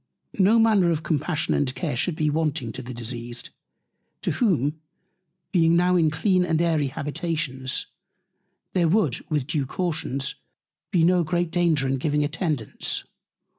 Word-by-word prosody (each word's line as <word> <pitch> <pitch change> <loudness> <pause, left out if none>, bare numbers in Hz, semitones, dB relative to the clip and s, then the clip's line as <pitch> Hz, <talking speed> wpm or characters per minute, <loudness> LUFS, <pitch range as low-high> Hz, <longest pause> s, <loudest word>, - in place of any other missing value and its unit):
No 200 +4 +5
Manner 215 -6 +4
of 160 -1 0
Compassion 155 +1 0
and 135 -2 0
Care 160 -7 -2
should 155 +7 0
be 155 -1 0
wanting 150 -6 -1
to 130 - -7
the 125 0 -8
Diseased; 120 0 -6 0.7
to - - 0
whom, 155 - +1 0.7
being 165 -3 +4
now 180 +1 +3
in 165 -3 +4
clean 185 +4 +2
and 165 -3 +1
airy 160 -4 +2
Habitations, 145 -2 -2 0.9
there 175 -3 +3
would, 165 - +1
with 150 -4 0
due 150 -2 -1
Cautions, 150 -5 -2 0.6
be 170 -3 +2
no 180 +1 +4
great 175 +1 -1
Danger 165 -6 +2
in 135 0 0
giving 150 +1 +1
Attendance. 145 - -2
155 Hz, 145 wpm, -24 LUFS, 140-175 Hz, 0.9 s, No